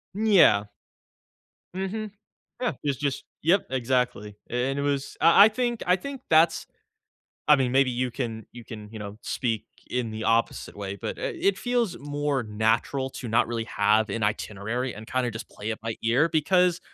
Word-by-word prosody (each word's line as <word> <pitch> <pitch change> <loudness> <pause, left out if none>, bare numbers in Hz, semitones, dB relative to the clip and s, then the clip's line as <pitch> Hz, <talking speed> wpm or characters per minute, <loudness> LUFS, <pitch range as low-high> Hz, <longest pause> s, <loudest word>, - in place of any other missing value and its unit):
Mm, 215 +2 -1
yeah. 100 - +6 1.1
Mhm. 200 +3 -3 0.5
Yeah, 245 - 0
it's 140 -3 0
just 140 -3 -2 0.2
Yep, 185 +5 +3
exactly, 125 -5 -1
a 125 +2 0
and 140 - -3
it - - 0
was 140 -1 -2
I 170 +5 +8
I 220 - +5
think 240 +1 -2
I 180 0 +4
think 275 +6 -7
that's 165 +1 +4 0.8
I 150 -1 +7
mean, 130 -2 +1
maybe 135 -1 +4
you 125 +1 -1
can 115 -4 -4
you 120 0 -10
can, 105 -2 -9
you 110 - -8
know, 100 0 -7
speak 115 -4 -2 0.2
in 125 -3 -2
the 110 0 -5
opposite 115 -1 0
way, 100 -1 -4
but, 100 - -5
eh, - - -2
it 195 -1 +2
feels 240 -7 0
more 145 -2 -1
natural 110 +5 0
to 130 - -7
not 115 +2 +2
really 115 -1 -3
have 105 +1 +2
an 110 +2 -2
itinerary 110 +4 -2
and 110 +1 -9
kinda 130 -1 0
just 110 +2 -8
play 105 - -6
it 110 - -6
by 115 -1 -3
ear 125 +8 +3
because 180 +3 +2
125 Hz, 185 wpm, -26 LUFS, 110-160 Hz, 1.1 s, I